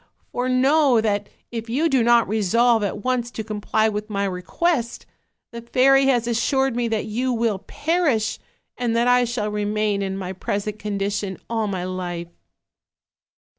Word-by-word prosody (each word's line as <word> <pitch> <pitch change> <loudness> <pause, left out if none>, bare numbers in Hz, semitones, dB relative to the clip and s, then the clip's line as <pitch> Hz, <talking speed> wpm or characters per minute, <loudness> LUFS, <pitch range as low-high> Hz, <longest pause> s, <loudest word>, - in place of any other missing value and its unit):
For 250 +1 -1
know 265 0 +4
that 205 -2 -1 0.2
if 230 -1 -5
you 285 +8 +1
do 270 -5 +2
not 235 0 +4
resolve 220 +3 +2
at 205 0 -3
once 255 -2 0
to 225 - -6
comply 215 0 0
with 210 0 -3
my 200 -1 -1
request, 235 - -1 0.5
the 235 0 -7
fairy 270 +3 +4
has 245 -4 +2
assured 265 +2 +1
me 240 -1 0
that 220 -2 -1
you 245 +4 -1
will 230 -4 0
per 335 +3 0
ish; 220 -6 0 0.4
and 240 -2 -1
that 235 +1 +2
I 245 0 +4
shall 225 -3 -2
remain 210 0 0
in 195 -1 -3
my 185 -1 -5
present 205 +3 -3
condition 200 -1 -2
all 225 -2 0
my 190 -3 -3
life.' 175 -2 -4
225 Hz, 165 wpm, -22 LUFS, 205-245 Hz, 0.5 s, know